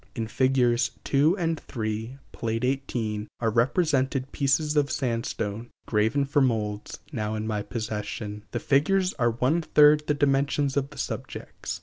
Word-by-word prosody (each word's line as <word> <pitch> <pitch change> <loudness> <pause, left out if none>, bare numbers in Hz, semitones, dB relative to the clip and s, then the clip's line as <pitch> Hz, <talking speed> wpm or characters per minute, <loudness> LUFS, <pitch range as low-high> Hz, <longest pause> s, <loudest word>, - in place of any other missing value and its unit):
In 115 -3 -2
Figs. 125 0 +2
2 150 +7 +3
and 165 -3 -1
3, 110 +2 -4
Pl. 115 - -4
XVIII, 120 -5 -2
are 115 -2 +1
represented 135 +2 +1
pieces 150 +2 +1
of 145 -1 +3
sand 115 -4 -1
stone, 110 +3 -4 0.2
graven 110 +6 +1
for 145 +1 +2
molds, 105 -5 -1
now 110 -5 -2
in 110 0 -3
my 105 -2 -1
possession. 105 -2 -5
The - - -3
figures 185 +7 +2
are 120 -1 +3
one 125 +8 +1
third 150 -1 +5
the 150 - +2
dimensions 140 0 +1
of 140 -1 0
the - - -14
subjects. - - -5
130 Hz, 150 wpm, -26 LUFS, 110-145 Hz, 0.2 s, third